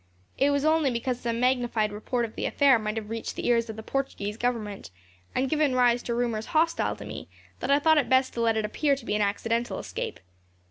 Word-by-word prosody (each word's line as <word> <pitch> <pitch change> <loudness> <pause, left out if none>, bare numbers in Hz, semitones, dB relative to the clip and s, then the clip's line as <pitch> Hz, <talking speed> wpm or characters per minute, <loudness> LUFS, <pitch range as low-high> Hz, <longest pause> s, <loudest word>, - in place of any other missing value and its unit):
It 275 - +4
was 285 0 +1
only 315 -2 +3
because 245 +1 -2
some 235 -1 -2
magnified 240 -4 +1
report 235 +3 -2
of 220 - -10
the - - -2
affair 275 -4 +4
might 215 0 -3
have 215 -1 -5
reached 225 0 -4
the - - -5
ears 230 -1 +2
of 220 - -5
the 220 - -8
Portuguese 215 -7 -3
Government, 220 - -3 0.5
and 265 - +1
given 295 -2 +1
rise 245 -1 +4
to 235 - -3
rumours 230 -2 -1
hostile 330 +1 +2
to - - -10
me, - - -7 0.3
that - - -4
I 280 - +6
thought 315 +1 +4
it 250 -5 -1
best 260 0 +3
to 235 - -2
let 225 -1 +2
it 215 - 0
appear 280 +6 +1
to 265 -4 -11
be - - -1
an 210 - +1
accidental 230 +4 -1
escape. - - -5
240 Hz, 230 wpm, -27 LUFS, 220-270 Hz, 0.5 s, I